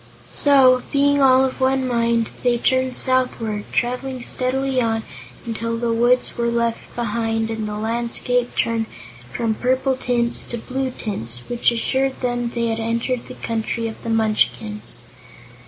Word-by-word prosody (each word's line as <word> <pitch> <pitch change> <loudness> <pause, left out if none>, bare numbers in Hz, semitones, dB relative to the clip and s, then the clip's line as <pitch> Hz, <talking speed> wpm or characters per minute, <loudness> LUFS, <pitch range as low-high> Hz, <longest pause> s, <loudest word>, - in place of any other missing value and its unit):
So, 265 -3 +5
being 285 0 +3
all 260 0 +6
of 265 0 -4
one 260 0 +2
mind, 235 -2 +1
they 245 -1 +2
turned 260 +1 +1
southward, 235 -5 +1
traveling 250 +1 -2
steadily 265 +1 +1
on 225 -1 0 0.4
until 230 0 -3
the 230 0 0
woods 240 +2 +2
were 235 0 +1
left 235 -1 -2
behind 225 -1 -1
and 220 -1 -3
the 210 0 -4
landscape 235 +2 0
turned 225 -1 0 0.4
from 225 - -1
purple 260 +3 +1
tints 240 -2 +1
to 240 - -4
blue 260 +3 -3
tints, 120 - -4
which 240 0 +2
assured 265 +3 0
them 245 -1 -1
they 235 -1 0
had 225 0 -1
entered 235 +2 -2
the - - -9
Country 230 0 -2
of 220 - -8
the 230 - -5
Munchkins. 215 -1 0
235 Hz, 150 wpm, -21 LUFS, 225-255 Hz, 0.4 s, all